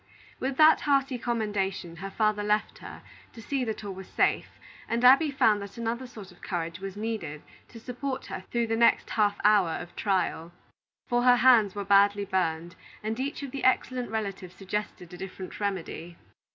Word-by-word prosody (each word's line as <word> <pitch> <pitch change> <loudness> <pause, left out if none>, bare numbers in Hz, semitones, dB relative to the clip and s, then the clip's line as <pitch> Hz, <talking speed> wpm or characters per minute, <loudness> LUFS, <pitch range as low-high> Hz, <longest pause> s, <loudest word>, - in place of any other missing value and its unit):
With 260 0 -3
that 315 0 +6
hearty 275 -3 +1
commendation, 205 -7 -2
her 195 +3 -6
father 215 0 0
left 210 +1 -1
her, - - -10 0.3
to 230 - -12
see 275 0 -1
that 220 -1 -4
all 200 -1 -5
was 190 0 -10
safe, - - +1 0.4
and 235 +1 -1
Abby 275 +5 +7
found 235 -7 +2
that 200 +1 -9
another 235 +2 -3
sort 210 -6 -11
of 180 - -20
courage 170 -2 -4
was 195 +1 -7
needed 205 -9 -4 0.2
to 230 - -12
support 255 +3 -5
her - - -7
through 235 -1 0
the 225 0 -1
next 235 +1 +3
half 205 -2 +1
hour 205 -4 +5
of 175 - -10
trial; 185 -4 -1 0.5
for 240 0 +1
her 250 0 +6
hands 235 -5 +5
were 200 -1 -4
badly 200 +1 +4
burned, 175 -2 -2 0.3
and 220 +2 -3
each 280 +2 -3
of 275 - -6
the 275 - -6
excellent 255 -2 +1
relatives 195 -4 -4
suggested 195 -3 -5
a - - -8
different 190 0 -8
remedy. 175 -4 -4
210 Hz, 180 wpm, -27 LUFS, 190-245 Hz, 0.5 s, Abby